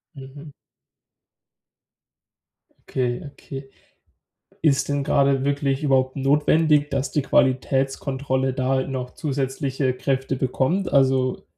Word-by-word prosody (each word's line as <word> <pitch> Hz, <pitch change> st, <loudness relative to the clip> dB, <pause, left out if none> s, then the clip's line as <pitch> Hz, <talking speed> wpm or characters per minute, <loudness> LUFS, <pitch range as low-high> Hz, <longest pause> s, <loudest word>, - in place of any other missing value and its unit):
Mhm. 140 Hz, +2 st, -11 dB, 2.4 s
Okay 125 Hz, -2 st, -1 dB
okay. 135 Hz, -1 st, -9 dB, 0.9 s
Ist 140 Hz, -4 st, +2 dB
denn 145 Hz, -1 st, 0 dB
grade 140 Hz, -2 st, +2 dB
wirklich 140 Hz, 0 st, 0 dB
überhaupt 130 Hz, -2 st, +2 dB
notwendig, 150 Hz, +2 st, +2 dB
dass 135 Hz, -1 st, -1 dB
die 150 Hz, -, 0 dB
Qualitätskontrolle 135 Hz, 0 st, 0 dB
da 130 Hz, 0 st, 0 dB
noch 130 Hz, -2 st, -5 dB
zusätzliche 135 Hz, -2 st, -2 dB
Kräfte 135 Hz, 0 st, -1 dB
bekommt? 135 Hz, +9 st, -1 dB
Also, 130 Hz, -2 st, +2 dB
135 Hz, 95 wpm, -23 LUFS, 130-145 Hz, 2.4 s, Ist